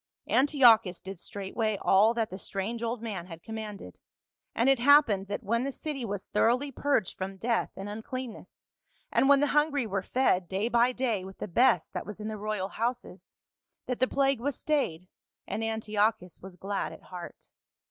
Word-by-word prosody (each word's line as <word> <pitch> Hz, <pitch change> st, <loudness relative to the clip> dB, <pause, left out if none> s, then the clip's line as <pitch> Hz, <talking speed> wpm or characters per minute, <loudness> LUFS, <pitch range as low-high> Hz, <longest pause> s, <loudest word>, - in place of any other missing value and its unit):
" -, -, -63 dB
Antiochus 240 Hz, -, +5 dB
did 190 Hz, -2 st, -8 dB
straightway 205 Hz, +3 st, -3 dB
all 215 Hz, +4 st, +4 dB
that 225 Hz, -4 st, -1 dB
the 190 Hz, -, -6 dB
strange 205 Hz, +5 st, -3 dB
old 235 Hz, 0 st, -3 dB
man 195 Hz, -6 st, -5 dB
had 165 Hz, -2 st, -10 dB
commanded; 215 Hz, -, -7 dB, 0.6 s
and 235 Hz, -, +2 dB
it 270 Hz, -2 st, +5 dB
happened 240 Hz, -7 st, +5 dB
that 205 Hz, +4 st, -4 dB
when 230 Hz, +4 st, 0 dB
the 275 Hz, -, -2 dB
city 280 Hz, -1 st, -5 dB
was 205 Hz, -3 st, -4 dB
thoroughly 250 Hz, +6 st, +1 dB
purged 275 Hz, -7 st, 0 dB
from 190 Hz, +1 st, -5 dB
death 230 Hz, +3 st, 0 dB
and 195 Hz, +1 st, -6 dB
unclean 225 Hz, +3 st, -5 dB
ness, -, -, -16 dB, 0.5 s
and 270 Hz, -, +3 dB
when 280 Hz, -1 st, +6 dB
the -, -, +4 dB
hungry 295 Hz, -3 st, +2 dB
were 195 Hz, -2 st, -2 dB
fed 190 Hz, -6 st, +1 dB
day 195 Hz, +4 st, 0 dB
by 240 Hz, +1 st, +3 dB
day 240 Hz, -6 st, -1 dB
with 190 Hz, 0 st, -10 dB
the -, -, -5 dB
best 245 Hz, +7 st, +3 dB
that -, -, -5 dB
was 210 Hz, 0 st, -7 dB
in 215 Hz, +1 st, -4 dB
the 215 Hz, -, -5 dB
royal 210 Hz, -2 st, -2 dB
houses, 240 Hz, +3 st, -4 dB, 0.5 s
that 250 Hz, -, -3 dB
the 255 Hz, -, +3 dB
plague 275 Hz, -2 st, +1 dB
was 280 Hz, +2 st, -2 dB
stayed, 185 Hz, -, -1 dB, 0.4 s
and 225 Hz, -, -3 dB
Antiochus 215 Hz, -3 st, -1 dB
was 190 Hz, -1 st, -10 dB
glad 195 Hz, +2 st, -3 dB
at -, -, -12 dB
heart. 180 Hz, -2 st, -10 dB
220 Hz, 190 wpm, -29 LUFS, 195-255 Hz, 0.6 s, when